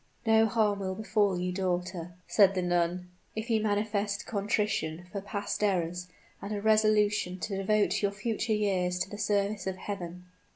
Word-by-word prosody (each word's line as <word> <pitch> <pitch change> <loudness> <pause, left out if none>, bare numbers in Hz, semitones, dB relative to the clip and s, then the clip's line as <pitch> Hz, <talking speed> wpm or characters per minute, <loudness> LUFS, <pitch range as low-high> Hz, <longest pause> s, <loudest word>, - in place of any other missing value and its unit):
"No 225 0 +5
harm 210 -2 +1
will 190 -1 -3
befall 210 -3 +1
you, 180 0 -1
daughter," 180 -2 -2
said 195 -2 +5
the 185 - 0
nun, 175 +1 0 0.2
"if 220 +2 -3
you 220 -1 +3
manifest 205 -1 -1
contrition 200 -5 -1
for 200 - -4
past 205 +1 -3
errors 180 -3 0 0.3
and 200 - -6
a 210 - -1
resolution 210 -3 +3
to 195 +1 -3
devote 210 +2 +2
your 200 - +2
future 220 +2 -2
years 185 -4 +1
to 180 +1 -2
the 205 - -7
service 205 -1 0
of 190 - -1
Heaven." 180 -2 -6
200 Hz, 165 wpm, -29 LUFS, 180-210 Hz, 0.3 s, No